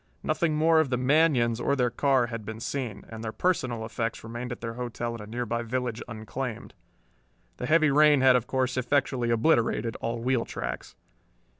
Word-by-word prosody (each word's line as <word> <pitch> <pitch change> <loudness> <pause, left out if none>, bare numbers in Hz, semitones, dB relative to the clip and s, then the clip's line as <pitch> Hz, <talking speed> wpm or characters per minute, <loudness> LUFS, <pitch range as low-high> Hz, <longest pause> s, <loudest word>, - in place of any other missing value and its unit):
Nothing 165 -4 0
more 160 +1 +4
of 160 -4 +2
the 125 - 0
Manions 130 -4 +3
or 140 +3 +1
their 125 -3 +1
car 135 -2 +2
had 115 -2 -6
been 110 +1 -7
seen, 115 -4 -4
and 110 0 -8
their 110 - -3
personal 125 -9 -1
effects 115 +1 -3
remained 120 +2 -6
at 120 - -5
their 115 -1 -5
hotel 120 -1 -4
in 115 - -7
a 105 - -9
nearby 120 +1 -2
village 120 -1 -3
unclaimed. 120 +1 -6 0.8
The 125 - -4
heavy 155 -1 +4
rain 150 -1 +5
had 130 -1 +6
of 125 -1 0
course 130 -1 -1
effectually 130 -1 0
obliterated 115 -2 +2
all 115 +1 -3
wheel 125 0 +1
tracks. - - -6
125 Hz, 180 wpm, -27 LUFS, 115-135 Hz, 0.8 s, had